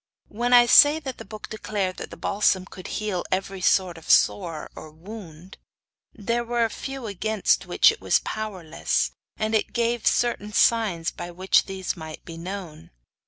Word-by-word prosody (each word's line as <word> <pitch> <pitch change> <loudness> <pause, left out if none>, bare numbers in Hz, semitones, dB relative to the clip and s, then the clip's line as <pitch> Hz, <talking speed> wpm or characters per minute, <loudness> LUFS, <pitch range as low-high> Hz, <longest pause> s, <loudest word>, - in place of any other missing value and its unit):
When 240 +3 -2
I 245 -1 +8
say 290 +5 +7
that 265 -5 -7
the - - -8
book 215 +2 -9
declared 205 -4 -3
that - - -7
the - - -11
balsam 195 -2 +1
could 185 -1 -10
heal 210 -4 -2
every 190 0 -2
sort 180 -2 +2
of 160 - -15
sore 170 -6 +2
or 155 - -10
wound, 180 +1 -12 0.5
there 230 +3 -2
were 235 0 0
a 225 - -3
few 270 -2 -6
against 215 0 0
which - - +5
it - - -10
was - - +3
powerless, 190 -7 -2 0.3
and 215 +1 -2
it 220 - 0
gave 235 -1 0
certain 230 -3 0
signs 205 -10 +2
by 175 - -7
which 185 +2 +2
these 190 -1 -4
might 160 -3 -9
be 165 - -8
known. 170 -2 -8
200 Hz, 170 wpm, -24 LUFS, 180-225 Hz, 0.5 s, I